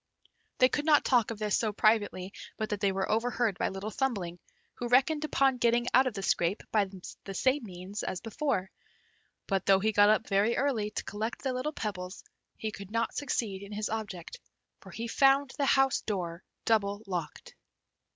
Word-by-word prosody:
They 255 - +6
could 290 +3 -2
not 305 -2 +5
talk 240 -5 +3
of 230 - -4
this 210 -1 0
so 220 -2 0
privately, 205 -3 +1 0.2
but 215 - -2
that 210 - -2
they 200 -1 +2
were 190 0 -1
overheard 230 -2 0
by - - +1
Little 195 +3 -5
Thumbling, 200 -10 -2 0.3
who 240 - -4
reckoned 275 +5 +3
upon 270 -3 +2
getting 235 0 +3
out 260 +2 +6
of 240 - -3
the 195 - -4
scrape 180 +1 +1
by 210 -2 +3 0.4
the 195 - -6
same 265 +6 +2
means 185 +2 -6
as 185 - -3
before; 225 -4 -2 0.7
but 195 -2 -1
though 195 -1 +6
he 215 +3 +1
got 205 0 +6
up 215 +1 +2
very 205 +4 +2
early 245 -7 0
to - - -4
collect 220 +3 -4
the 265 -2 0
little 255 +4 -2
pebbles, 190 -8 -5 0.3
he 220 - -3
could 200 -2 -9
not 230 +1 -1
succeed 220 -9 -2
in 200 +1 -9
his 210 +1 -2
object, 215 - -5 0.4
for - - -14
he 230 +1 -5
found 270 +3 +4
the 280 - +2
house 270 -1 +3
door 175 -5 -4 0.2
double 205 -2 +1
locked. 175 -6 -5
215 Hz, 190 wpm, -30 LUFS, 195-250 Hz, 0.7 s, They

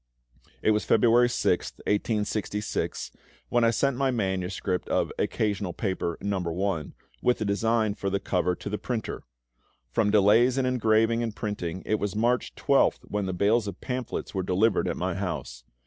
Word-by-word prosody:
It - - +4
was 105 0 +1
February 120 +2 +4
6th, 120 - 0
1866, 105 0 -1 0.4
when 120 -1 +2
I 115 - +5
sent 135 +4 +1
my 135 0 +2
manuscript 95 -5 -2
of - - +1
"Occasional 100 -4 -1
Paper, 95 -4 -2
No. 100 -1 -1 0.3
I.," 80 -5 -4 0.4
with 125 - +2
a 110 - -1
design 110 +1 +1
for 100 -1 -3
the 100 0 0
cover, 90 -2 0
to - - -9
the - - -2
printer. - - -3 0.7
From 110 -2 +2
delays 110 +5 +5
in 135 - +2
engraving 115 -2 +2
and 115 -2 -3
printing, 95 -4 -4
it 110 - 0
was 100 -1 -2
March 120 +3 +1
12th - - +2
when 105 -2 -1
the - - -1
bales 105 +4 +2
of 100 - -6
pamphlets 125 -2 -4
were 95 - -1
delivered 95 +5 +2
at - - -2
my - - -1
house. - - -5
105 Hz, 165 wpm, -27 LUFS, 95-115 Hz, 0.7 s, I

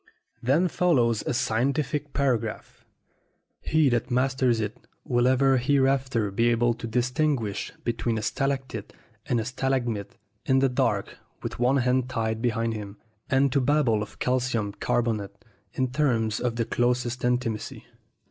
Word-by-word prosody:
Then 145 +9 +3
follows 125 -11 +2
a - - 0
scientific 140 +5 0
par 140 -3 +2
agraph. 110 -1 -7 0.8
He 155 -2 +2
that 120 +1 0
masters 130 -1 +2
it 105 -1 -2 0.3
will 120 0 +2
ever 135 +1 +4
hereafter 130 -4 +1
be 115 +4 +2
able 120 0 +2
to 115 0 -7
distinguish 125 -2 0
between 115 -1 -1
a 110 - -3
stalactite 135 +3 -2 0.3
and 120 - +1
a 110 - -2
stalagmite 120 -4 -2 0.3
in 135 -1 +2
the 135 0 +3
dark 125 - -1 0.2
with - - -5
one 125 +3 +3
hand 125 0 +1
tied 110 -2 -2
behind 115 -1 0
him, 105 -1 -7 0.3
and 135 +1 +3
to 140 +1 +2
babble 130 -5 +2
of 105 - -7
calcium 125 -5 0
carbonate 105 -2 -1 0.4
in 130 -1 -1
terms 115 -7 +1
of 120 -2 -1
the 115 -1 0
closest 120 +1 0
intimacy. 120 -3 -2
125 Hz, 145 wpm, -26 LUFS, 115-135 Hz, 0.8 s, ever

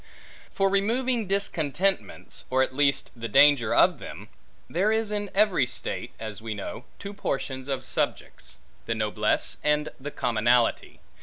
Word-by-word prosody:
For 195 - +2
removing 225 +4 +1
discontentments, 190 -1 -1
or 130 +1 +3
at 130 - -4
least 140 -1 +2
the 115 -1 -5
danger 125 0 +5
of - - +4
them; - - -9 0.4
there 195 +6 +1
is 220 -1 0
in 205 -1 -2
every 195 -10 +3
state - - -3
(as 110 -1 -5
we 110 -1 -4
know) 110 +5 -7
two 200 0 -7
portions 135 -8 -3
of 135 -2 -2
subjects; - - -2 0.3
the 115 - 0
noblesse 110 -1 -1
and 150 0 +1
the 140 +2 -5
commonalty. 120 -2 +1
145 Hz, 145 wpm, -26 LUFS, 125-200 Hz, 0.4 s, danger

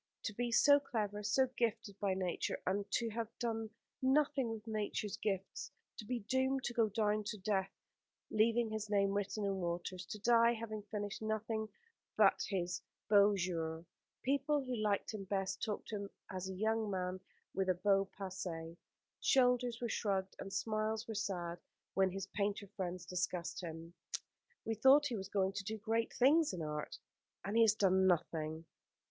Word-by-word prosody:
To 215 - -2
be 240 +3 -1
so 285 +5 +7
clever, 210 -6 -2
so 215 +6 +3
gifted 225 -3 -1
by 195 -2 +1
nature, 185 -2 -1
and 200 +2 0
to 230 -2 +1
have 230 +1 -2
done 225 -2 -2 0.3
nothing 270 -1 +3
with 225 -1 -5
nature's 215 -1 -2
gifts 195 -2 -3 0.3
to 215 - -7
be 245 +1 -2
doomed 260 +5 +1
to 240 - -2
go 230 -2 +3
down 210 0 +1
to 215 - -3
death 195 -1 0 0.6
leaving 225 +1 +3
his 215 -1 -3
name 200 -1 +3
written 205 +1 -1
in 195 -1 0
water 175 +1 -3
to 190 +4 -6
die, 235 +1 +5
having 220 -2 -5
finished 205 -1 -4
nothing 220 0 -2 0.5
but - - +5
his 180 -2 -1 0.3
beaux 205 0 +7
jours: 165 -2 -2 0.4
people 280 +2 +2
who 255 -1 -3
liked 210 -1 0
him 200 -2 -5
best 195 -1 -1
talked 215 -1 -3
of 205 - -2
him 200 - -6 0.2
as 190 0 -4
a 190 - -5
young 220 +2 +1
man 185 -1 -2 0.3
with 190 -1 0
a 185 - +4
beau 195 +1 +2
passé. 170 -4 -5 0.4
Shoulders 250 -2 +3
were 240 - 0
shrugged, 195 -4 -1
and 195 - -6
smiles 215 +2 -1
were 225 - -3
sad, 175 -4 -2 0.3
when 190 -1 +3
his 195 +1 -4
painter 200 +1 -1
friends 180 -2 -3
discussed 180 0 -2
him. 165 0 -7 0.7
"We 225 - 0
thought 265 +6 +6
he 255 -5 -1
was 195 -2 -5
going 195 -1 +1
to 200 +1 -3
do 220 +3 -3
great 225 +2 0
things 290 +1 +4
in 175 -3 -3
art, 150 0 -4 0.5
and 200 +2 -2
he 230 - +6
has 220 -2 +6
done 190 -2 +4
nothing." 160 -2 0
205 Hz, 175 wpm, -36 LUFS, 190-225 Hz, 0.7 s, so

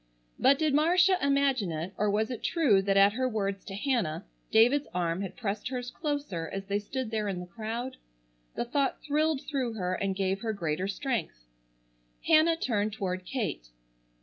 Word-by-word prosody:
But 275 +1 +5
did 310 -1 +1
Marcia 360 +5 +4
imagine 275 -8 +2
it, 165 +4 -4
or 210 - +1
was 215 +3 0
it 245 - -5
true 265 - +3
that 195 0 +1
at 200 +1 +6
her 255 +2 0
words 200 -3 -2
to 195 - -6
Hannah, 205 - -1 0.2
David's 245 +6 +4
arm 170 0 0
had 195 - -5
pressed 215 -2 -3
hers 250 -1 -4
closer 285 - -3
as 195 0 -4
they 200 +1 0
stood 240 +3 -4
there 215 -2 -1
in 190 -3 -2
the 180 - -6
crowd? 230 +7 -5 0.6
The - - -1
thought 275 +3 -1
thrilled 305 -1 +1
through 260 -5 -2
her 185 -4 -2
and 195 +1 -1
gave 195 0 -1
her 225 -2 -1
greater 170 -1 -2
strength. 205 - -3 0.8
Hannah 325 +1 +5
turned 215 -8 0
toward 185 -3 -3
Kate. 210 - -3
220 Hz, 175 wpm, -29 LUFS, 195-275 Hz, 0.8 s, at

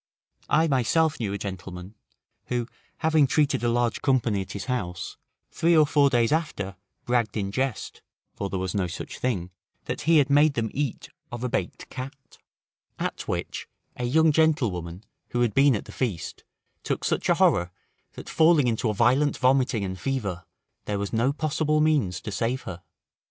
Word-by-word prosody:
I 160 +2 +4
myself 150 +4 +2
knew 105 -4 -2
a 100 - -2
gentleman, 95 -1 -7 0.5
who 120 -2 -2 0.3
having 155 -3 +4
treated 140 -2 +1
a 120 - +2
large 120 0 0
company 120 -7 +1
at 95 - -7
his 100 - -5
house, 95 -9 -3 0.4
three 170 0 +3
or 155 - +7
four 145 -1 +4
days 120 -3 +2
after 150 - -1 0.3
bragged 120 -3 0
in 100 -2 -2
jest 130 +1 -3 0.3
(for 100 - -4
there 95 - -2
was 95 0 -2
no 95 -3 0
such 85 - -7
thing), 95 -8 -2 0.3
that - - -4
he 165 0 +4
had 145 -2 +4
made 145 +1 +4
them 110 -2 -1
eat 140 -3 -3 0.2
of 120 0 -5
a 125 - -1
baked - - -3
cat; 135 +1 -9 0.6
at - - -4
which, - - -3 0.3
a 125 - -5
young 160 +5 +4
gentlewoman, 110 - +1 0.3
who 120 - -1
had 120 -4 +2
been 135 -2 +5
at 100 - -4
the - - -10
feast, 95 - -3 0.4
took - - -3
such - - 0
a - - +5
horror, 85 0 +3 0.4
that - - -10
falling 160 -3 +4
into 115 0 0
a 105 - -1
violent 130 +6 +3
vomiting 130 -4 +2
and 95 -1 -5
fever, 100 -7 -3 0.4
there 105 - -2
was 100 +1 -4
no 115 +4 +2
possible 155 +1 0
means 140 -13 +2
to 105 - -6
save 115 +6 -1
her. 90 -2 -7
120 Hz, 180 wpm, -26 LUFS, 100-145 Hz, 0.6 s, or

